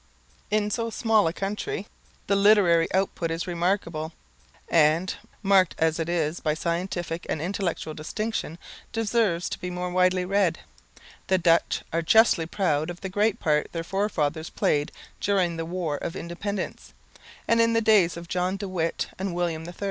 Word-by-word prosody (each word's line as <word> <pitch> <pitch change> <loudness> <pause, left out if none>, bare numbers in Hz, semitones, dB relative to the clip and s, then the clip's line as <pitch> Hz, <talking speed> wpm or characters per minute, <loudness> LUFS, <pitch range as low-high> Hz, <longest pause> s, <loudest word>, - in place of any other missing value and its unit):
In 210 0 +1
so 230 +1 -1
small 220 -3 +2
a - - +1
country 210 - -3 0.4
the 200 - +2
literary 195 -5 +5
output 185 -3 0
is 165 +1 -2
remarkable, 170 -3 -1 0.5
and, 165 +3 +3 0.3
marked 195 -3 +4
as 160 0 +1
it 165 +1 -2
is 165 -1 0
by 155 -1 0
scientific 170 +1 -3
and - - -1
intellectual 175 -2 -2
distinction, 165 +2 -4 0.3
deserves 215 -6 +1
to - - -5
be 180 - -4
more 180 0 -3
widely 185 0 +2
read. 200 +2 +2 0.7
The 190 - +3
Dutch 170 -1 +2
are 165 - +1
justly 170 -2 +4
proud 160 -4 0
of 175 0 -7
the 190 - -4
great 205 +2 +1
part 150 -1 +1
their 165 -1 -3
forefathers 165 -5 -1
played 145 0 0 0.3
during 185 -4 +1
the 165 - -3
War 170 -4 -2
of 165 - -5
Independence, 185 +3 -5 0.5
and 230 0 +4
in 230 0 +3
the 230 - +4
days 210 -7 +4
of 170 0 -8
John 180 +2 -1
de 200 - -5
Witt 170 -3 -2
and 190 -2 -2
William 165 -2 -2
III. 175 - -9
180 Hz, 165 wpm, -26 LUFS, 165-200 Hz, 0.7 s, literary